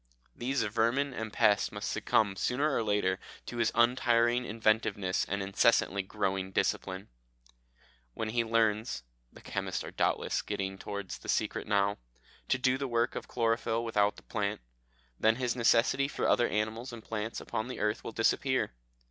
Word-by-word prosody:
These 130 +1 -1
vermin 115 +6 +1
and 110 -2 -4
pests 105 -1 +3
must - - -4
succumb 100 -3 +2
sooner 140 +8 +1
or - - +2
later 105 -3 +1 0.3
to 120 - -6
his 115 -2 +2
untiring 120 0 +3
inventiveness 110 -3 +1
and 100 0 -2
incessantly 100 0 +3
growing 95 -1 -2
discipline. 95 0 -1 1.1
When 110 - -2
he 120 +1 +1
learns 110 - +1 0.3
(the - - -15
chemists - - -3
are - - -7
doubtless - - 0
getting 95 -2 -4
towards 100 -2 -5
the - - -10
secret - - 0
now) 100 -1 +1 0.5
to 135 - +3
do 130 +1 +1
the 140 - -2
work 120 0 +1
of - - -5
chlorophyll 115 0 0
without 105 -2 +2
the - - -14
plant, 105 - -2 0.6
then 110 +1 +4
his 125 -1 -1
necessity 120 +3 +3
for - - -1
other 120 - +4
animals 110 +4 -2
and 115 -2 -9
plants 110 0 -4
upon 110 - -3
the 130 - -6
earth 105 0 0
will - - -5
disappear. 130 - +1
110 Hz, 160 wpm, -31 LUFS, 105-120 Hz, 1.1 s, then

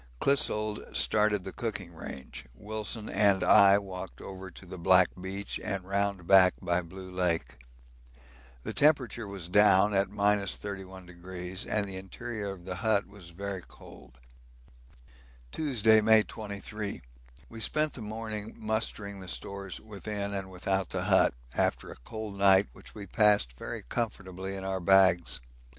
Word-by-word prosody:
Clissold 110 -6 +1
started 105 -2 +2
the 95 - -6
cooking 100 -7 -4
range, 65 -6 -9
Wilson 110 - -5
and 100 -1 +3
I 100 0 +7
walked 95 -2 -7
over 95 0 -8
to 90 - -13
the 90 0 -9
Black 90 +1 +5
beach 95 +2 -5
and 100 -3 -2
round 100 -1 -1
back 95 0 +6
by 90 -1 0
Blue 95 +2 -10
Lake. 90 -8 -1 1.0
The - - -4
temperature 130 -7 +2
was 95 -4 -6
down 105 +1 +5
at 100 0 +2
31° 95 -3 -3
and 105 -1 +1
the 95 -1 -7
interior 100 +2 -5
of 90 -2 -13
the 90 -1 -4
hut 110 -1 +1
was 100 -3 -12
very 95 +2 -5
cold. - - -15 1.3
Tuesday, 115 -8 +3
May 110 0 +6
23. 105 -1 -6 0.4
We 115 - -10
spent 150 +6 +1
the 125 - -8
morning 110 0 -5
mustering 105 -2 -3
the 95 - -9
stores 100 0 -5
within 105 -1 -5
and 95 -1 -4
without 95 0 -1
the - - -2
hut, - - +4 0.2
after - - 0
a - - -9
cold 110 - -7
night 95 0 +5
which - - -14
we 105 -2 -7
passed 100 - +3
very - - -6
comfortably 95 - -4
in 95 - -6
our 95 0 -2
bags. 95 -2 +4
100 Hz, 145 wpm, -29 LUFS, 95-105 Hz, 1.3 s, I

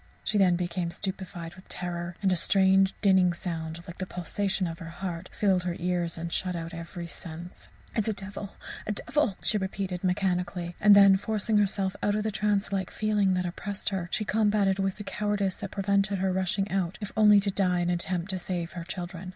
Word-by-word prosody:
She 210 - +1
then 185 -3 +5
became 175 0 -2
stupefied 180 -2 -5
with 185 +1 -16
terror, 175 -1 -4
and 190 - +4
a - - +3
strange, 190 +2 +4
dinning 190 -3 +5
sound, 165 -1 -4
like 170 - -10
the 185 - -3
pulsation 190 +3 -1
of 165 -1 -5
her 165 -2 -7
heart, 175 0 -5
filled 190 -3 +2
her 175 -1 -2
ears 175 -1 -1
and 170 0 -4
shut 185 -1 -1
out 165 0 -5
every 170 +1 -6
sense. 170 +1 -7 0.3
"It 220 - +1
is - - -1
a 220 - +1
devil! 200 0 -7 0.3
a 210 - 0
devil!" 215 -1 0
she 210 - +1
repeated 190 -1 -3
mechanically; 180 -2 0
and 210 -1 +8
then, 200 -1 +8
forcing 215 +1 0
herself 195 -2 +1
out 205 0 +2
of 210 - 0
the 220 - -1
trance 205 -1 0
like 190 -2 -1
feeling 210 -3 +1
that 180 0 0
oppressed 195 +3 -3
her, 185 -3 -3
she 215 - 0
combated 205 -2 +2
with 195 -1 0
the 205 - -7
cowardice 205 -2 -1
that 200 - -5
prevented 200 0 +1
her 190 0 +1
rushing 190 +2 0
out 190 -2 -1
if 205 -2 -5
only 210 -1 +7
to 200 0 0
die 180 -2 +1
in 175 - 0
an - - +2
attempt 175 +1 -1
to 185 - -2
save 175 -1 -3
her 175 - -6
children. 180 0 -6
190 Hz, 210 wpm, -28 LUFS, 175-200 Hz, 0.3 s, and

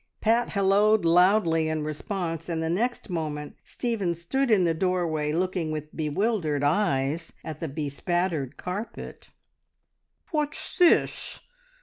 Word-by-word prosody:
Pat 230 +2 +2
halloed 200 0 +3
loudly 170 -2 +4
in 155 -1 -1
response, 165 +2 -4
and 165 -1 -1
the 160 - -1
next 240 +8 -1
moment 150 -3 -4
Stephen 210 -8 -2
stood 255 +11 -1
in 205 -5 +5
the 170 -1 +2
doorway, 165 -4 0
looking 175 -1 -1
with 155 0 -6
bewildered 155 -1 0
eyes 150 -1 +1
at 155 -2 -6
the 165 - -3
bespattered 150 +1 -2
carpet. 195 +5 -6 1.0
"What's 300 -1 -2
this? 350 -2 +3
170 Hz, 120 wpm, -26 LUFS, 155-205 Hz, 1.0 s, in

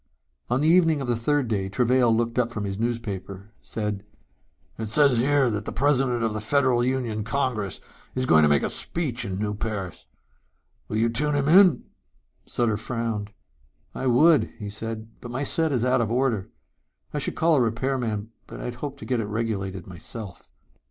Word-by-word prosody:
On 125 +3 +1
the 155 - +3
evening 165 -3 +4
of 135 - -4
the 120 - +1
third 135 +3 0
day 100 -3 -1
Travail 125 +4 +3
looked 115 +2 +1
up 120 -1 +1
from 105 -3 -4
his 100 0 -4
newspaper, 100 -4 -4
said, 105 -2 -4 0.8
"It 110 -1 -3
says 140 0 +4
here 140 +1 +3
that 105 -1 -3
the - - -4
president 125 -1 +1
of 110 -1 0
the 110 - -3
Federal 130 +1 +2
Union 120 -4 -1
Congress 115 -5 -2 0.4
is 130 0 0
going 80 -9 +5
to 75 - +5
make 70 -1 +3
a - - 0
speech 130 -8 -1
in 95 -4 -4
New 105 +1 -2
Paris. 100 - -5 0.8
Will 110 - -3
you 115 +1 +3
tune 145 +6 0
him 140 0 +1
in?" 180 -4 +6 0.6
Sutter 115 -3 0
frowned. 115 -2 -3 0.6
"I 130 - -3
would," 150 +5 +4
he 105 -3 -6
said, 110 +1 -5
"but 120 - -8
my 130 +4 -3
set 160 +2 +2
is 125 -3 +1
out 125 -1 +3
of 115 - -1
order. 120 -5 0 0.6
I - - -1
should - - -1
call 165 0 +3
a - - +4
repair 125 +4 0
man, 110 -2 -3 0.2
but - - -9
I - - -6
had 125 - -4
hoped 140 -1 -4
to - - -7
get 125 -2 0
it 110 - -2
regulated 100 -4 -3
myself." 95 +2 -8
115 Hz, 190 wpm, -25 LUFS, 105-130 Hz, 0.8 s, in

